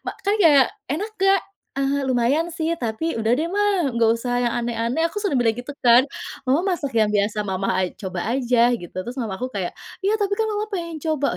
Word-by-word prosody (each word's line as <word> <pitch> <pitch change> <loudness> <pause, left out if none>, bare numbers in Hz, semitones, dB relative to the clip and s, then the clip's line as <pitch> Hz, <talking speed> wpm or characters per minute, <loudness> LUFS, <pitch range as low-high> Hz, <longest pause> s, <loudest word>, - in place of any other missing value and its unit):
ma - - -3
kan 410 +2 +1
kayak, 290 - +6 0.2
"Enak 370 - -3
nggak?" 390 0 +4 0.4
"Eee, 275 +1 0
lumayan 265 +6 +1
sih, 335 0 -1
tapi 235 +9 -2
udah 225 0 -1
deh, 325 - 0
Ma, 400 -2 +1
nggak 230 -1 +3
usah 245 +1 -1
yang 240 -1 0
aneh-aneh," 235 +6 0
aku 415 +4 -5
sudah 305 - +1
bilang 225 -2 +2
gitu 245 +4 -7
kan. 240 +1 +6 0.4
"Mama 340 +9 +1
masak 285 -5 -4
yang 215 - +4
biasa 205 +1 0
Mama 190 0 -1
a 185 - +2
coba 185 -4 -5
aja," 245 0 +3
gitu. 175 -7 -8
Terus 245 - -5
mamaku 220 +3 -3
kayak, 190 -3 -2 0.3
"Iya 425 +3 +1
tapi 405 -1 0
kan 440 +1 -1
Mama 420 0 -2
pengen 335 -6 -5
coba," 300 -2 0
265 Hz, 205 wpm, -22 LUFS, 230-340 Hz, 0.4 s, kayak